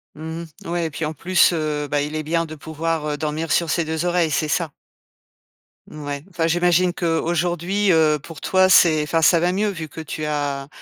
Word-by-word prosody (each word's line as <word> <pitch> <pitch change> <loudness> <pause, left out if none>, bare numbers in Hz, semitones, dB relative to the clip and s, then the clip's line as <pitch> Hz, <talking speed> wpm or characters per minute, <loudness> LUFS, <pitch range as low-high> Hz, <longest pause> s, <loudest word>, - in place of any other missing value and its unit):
Mmh 160 +2 -6 0.2
mh. 170 - -8
Ouais, 170 -1 -1
et - - -2
puis, 150 +2 -3
en 155 - -3
plus, 175 +4 +3
heu, 150 -2 -2
bah, 145 0 0
il 150 +2 -4
est 155 - -2
bien 165 +2 0
de 155 0 -9
pouvoir, 160 +1 -3
heu, 145 - -2
dormir 155 +1 -3
sur 170 -2 +2
ses 165 +1 0
2 160 +2 -2
oreilles, 175 -3 +1
c'est 155 - 0
ça. 160 0 -1 1.2
Ouais, 145 -1 -6
enfin, 170 -3 -1
j'imagine 175 +1 +2
qu'aujourd'hui, 175 +3 0
heu, 155 -2 +3
pour 160 -2 -11
toi, 185 0 +3
c'est 160 -4 +6
enfin, 160 +2 0
ça 170 +2 +5
va 175 +2 +1
mieux, 205 +3 0
vu 160 -4 -7
que 160 - -8
tu 155 -1 -6
as 145 -2 -2
160 Hz, 210 wpm, -21 LUFS, 150-175 Hz, 1.2 s, c'est